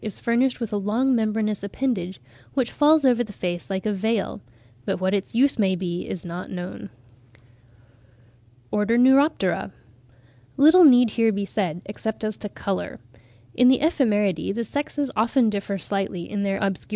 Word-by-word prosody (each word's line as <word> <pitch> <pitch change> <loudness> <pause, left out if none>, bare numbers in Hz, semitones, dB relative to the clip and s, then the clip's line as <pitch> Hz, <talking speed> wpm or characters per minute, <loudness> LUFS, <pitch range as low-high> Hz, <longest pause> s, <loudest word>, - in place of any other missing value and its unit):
is 215 - -7
furnished 245 +2 +1
with 230 -3 -4
"a - - +1
long 225 +7 +1
membranous 215 -2 -1
appendage, 200 -3 -3 0.4
which 255 -3 0
falls 300 0 +4
over 245 -2 +3
the 215 - -10
face 175 -2 -5
like 190 0 -3
a 215 - 0
veil;" 215 +1 -2 0.4
but - - -2
what 185 +1 0
its 200 +2 -2
use 275 +1 +2
may 190 -3 +2
be, 175 -1 -4
is 180 - -6
not 175 +1 -6
known. 180 0 -7 1.8
ORDER, 210 +3 +1
NEUROPTERA. 260 - +3 0.9
Little 320 +5 +7
need 245 -5 +6
here 225 0 +2
be 200 -1 -2
said, 180 -5 -3
except 220 +2 -5
as 215 -1 -2
to 210 - -6
colour. 195 -1 -4 0.5
In 250 - +4
the 260 0 +6
Ephemeridae 210 - 0
the 235 - -2
sexes 285 +2 -3
often 230 +1 +2
differ 200 -1 -3
slightly 195 -2 -4
in 205 -1 -3
their 195 -1 0
obscure - - 0
tints 190 - -9
(49. - - -29
215 Hz, 170 wpm, -23 LUFS, 195-250 Hz, 1.8 s, Little